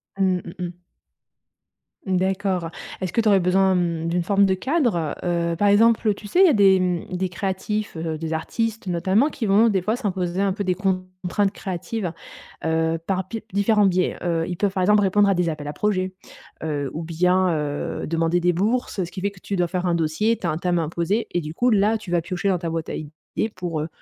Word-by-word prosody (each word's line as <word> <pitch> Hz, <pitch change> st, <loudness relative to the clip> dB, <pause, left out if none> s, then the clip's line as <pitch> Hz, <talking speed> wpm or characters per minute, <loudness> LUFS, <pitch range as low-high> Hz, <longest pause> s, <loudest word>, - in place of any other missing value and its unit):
Mmh, 190 Hz, -2 st, +2 dB
mmh 170 Hz, -, -8 dB
mh. 175 Hz, -1 st, -5 dB, 1.3 s
Mmh 185 Hz, -1 st, +1 dB
d'accord. 190 Hz, -2 st, 0 dB, 0.3 s
Est-ce 185 Hz, -2 st, -2 dB
que -, -, 0 dB
tu 220 Hz, -, -1 dB
aurais 200 Hz, -2 st, +5 dB
besoin, 190 Hz, +1 st, +3 dB
mmh, 170 Hz, -2 st, -1 dB
d'une 175 Hz, +1 st, 0 dB
forme 200 Hz, +2 st, +3 dB
de 190 Hz, -, +2 dB
cadre? 225 Hz, -, 0 dB
Heu, 170 Hz, -1 st, 0 dB
par 205 Hz, +3 st, +2 dB
exemple, 225 Hz, +2 st, +4 dB
heu, 210 Hz, -, +4 dB
tu 205 Hz, +1 st, -10 dB
sais, 280 Hz, -, +1 dB
il -, -, +9 dB
y 360 Hz, -, +6 dB
a -, -, +4 dB
des, 195 Hz, -3 st, +5 dB
mmh, 180 Hz, 0 st, -1 dB
des 185 Hz, 0 st, -1 dB
créatifs, 195 Hz, +3 st, -3 dB
heu, 160 Hz, -1 st, -3 dB
des 160 Hz, 0 st, -4 dB
artistes 225 Hz, +6 st, -2 dB
notamment 190 Hz, -, +2 dB
qui 245 Hz, -, -4 dB
vont 210 Hz, +3 st, +5 dB
des 195 Hz, -4 st, +2 dB
fois 215 Hz, +5 st, 0 dB
s'imposer 190 Hz, -5 st, -2 dB
un 195 Hz, -2 st, +2 dB
peu 205 Hz, -, -3 dB
des 185 Hz, -1 st, 0 dB
contraintes 185 Hz, +1 st, -1 dB
créatives. 185 Hz, 0 st, -4 dB, 0.5 s
Heu, 160 Hz, 0 st, +1 dB
par 190 Hz, -1 st, -1 dB
pi 225 Hz, +1 st, -6 dB
différents 205 Hz, +1 st, +3 dB
biais. 185 Hz, 0 st, +1 dB
Heu, 165 Hz, -2 st, 0 dB
ils 175 Hz, -, -3 dB
peuvent, 205 Hz, +1 st, +1 dB
par 185 Hz, -, 0 dB
exemple, 210 Hz, +2 st, +5 dB
répondre 205 Hz, +1 st, +3 dB
à -, -, +4 dB
des 175 Hz, -1 st, +1 dB
appels 150 Hz, -2 st, -5 dB
à 145 Hz, -, -4 dB
projets, 185 Hz, -3 st, -1 dB, 0.5 s
heu, 145 Hz, -3 st, -2 dB
ou 165 Hz, +2 st, -4 dB
bien, 180 Hz, +3 st, +2 dB
heu, 145 Hz, -1 st, -3 dB
demander 165 Hz, +1 st, +1 dB
des 175 Hz, 0 st, +2 dB
bourses. 210 Hz, +1 st, 0 dB
Ce 175 Hz, -, -7 dB
qui 190 Hz, -, -6 dB
fait 200 Hz, +1 st, 0 dB
que 195 Hz, -, -17 dB
tu 200 Hz, -, -3 dB
dois 175 Hz, -1 st, +1 dB
faire 180 Hz, +1 st, -2 dB
un 170 Hz, -, +2 dB
dossier, 170 Hz, +8 st, +1 dB
tu 175 Hz, -, -3 dB
as -, -, +1 dB
un 155 Hz, -, -2 dB
thème 175 Hz, 0 st, 0 dB
imposé 170 Hz, +7 st, -1 dB
et 175 Hz, -, 0 dB
du 155 Hz, +1 st, -6 dB
coup 245 Hz, +7 st, +2 dB
là 215 Hz, +1 st, +3 dB
tu 195 Hz, -5 st, -9 dB
vas 175 Hz, -, +2 dB
piocher 180 Hz, +3 st, -2 dB
dans 185 Hz, -, +2 dB
ta 170 Hz, -1 st, -3 dB
boîte 165 Hz, -1 st, -3 dB
à -, -, -3 dB
idée 155 Hz, +8 st, -5 dB
pour, 170 Hz, -4 st, -3 dB
heu, 155 Hz, -, -3 dB
185 Hz, 230 wpm, -23 LUFS, 170-200 Hz, 1.3 s, il